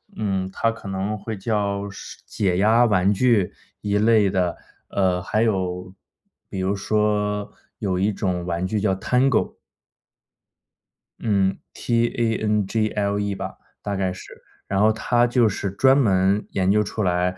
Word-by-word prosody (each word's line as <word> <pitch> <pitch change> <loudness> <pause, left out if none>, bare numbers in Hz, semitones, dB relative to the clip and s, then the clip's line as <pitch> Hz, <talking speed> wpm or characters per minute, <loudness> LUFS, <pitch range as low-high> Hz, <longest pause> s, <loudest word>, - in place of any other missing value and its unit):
嗯， 95 -3 -2
它 115 +3 0
可 115 -3 -10
能 95 +2 -2
会 110 0 -6
叫 100 -1 -1
是 95 - -10
解 95 -4 -1
压 110 +5 +4
玩 100 -2 +3
具 105 -3 +2 0.3
一 105 0 0
类 105 -2 +4
的， 90 -3 0 0.3
呃， 95 -2 +1
还 110 +4 -1
有 95 -4 -1 0.6
比 95 - -5
如 95 +2 0
说 105 0 0 0.3
有 95 -3 -1
一 105 +3 +2
种 90 -4 -2
玩 85 0 -2
具 105 +1 -1
叫 100 -2 +1
Tangle。 125 +5 +1 1.6
嗯 100 -3 +1 0.2
，T-A-N-G-L-E 105 -3 0
吧， 95 0 -6 0.2
大 100 -1 -3
概 95 -1 0
是。 95 - -9 0.5
然 95 0 0
后 110 +1 +5
它 120 +2 +2
就 120 -1 +3
是 100 -1 -2
专 130 +7 +4
门 100 -4 +2
研 95 -1 0
究 105 +1 +3
出 105 +1 -3
来， 90 0 0
100 Hz, 185 characters per minute, -23 LUFS, 95-110 Hz, 1.6 s, 后